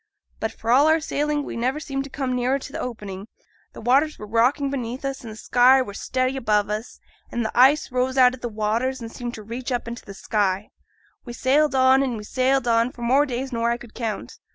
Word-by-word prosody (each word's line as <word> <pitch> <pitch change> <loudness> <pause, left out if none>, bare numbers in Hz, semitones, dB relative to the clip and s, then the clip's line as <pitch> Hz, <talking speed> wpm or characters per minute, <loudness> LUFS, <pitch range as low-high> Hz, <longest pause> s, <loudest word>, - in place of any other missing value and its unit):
But, 220 - -2
for 230 - -3
all 275 +5 +6
our 320 +1 +4
sailing, 295 -1 -1
we - - -6
never 255 +5 -1
seemed 275 -3 -3
to - - -9
come 260 -2 -2
nearer 250 +2 +1
to 275 0 -10
th' - - -4
opening. 205 -5 -6 0.5
The - - -10
waters 275 +7 +2
were 210 - -8
rocking 245 +6 +2
beneath 255 0 -4
us, 275 -1 -3
and 230 - -8
the - - -9
sky 250 +4 +4
were 205 - -8
steady 255 +5 -1
above 210 -4 +1
us; 215 +3 -5 0.3
and 235 -1 -2
th' - - -2
ice 270 +4 +4
rose 255 +1 0
out 250 -1 +6
o' 260 - -9
the 240 - -4
waters, 225 +5 -1
and 230 -1 -7
seemed 240 0 -6
to 215 - -9
reach 240 +4 -6
up 245 -2 -2
into 235 +1 -6
the 200 - -10
sky. 195 0 -1 0.5
We 240 - -8
sailed 275 +4 +2
on, 260 +1 +5
and 255 -4 -1
we 210 - -7
sailed 255 +3 +1
on, 230 +1 +3
for 240 - -9
more 270 +5 +3
days 260 +1 -4
nor 230 0 0
I 235 - 0
could 240 -2 -14
count. 225 -3 -5
250 Hz, 235 wpm, -23 LUFS, 230-270 Hz, 0.5 s, all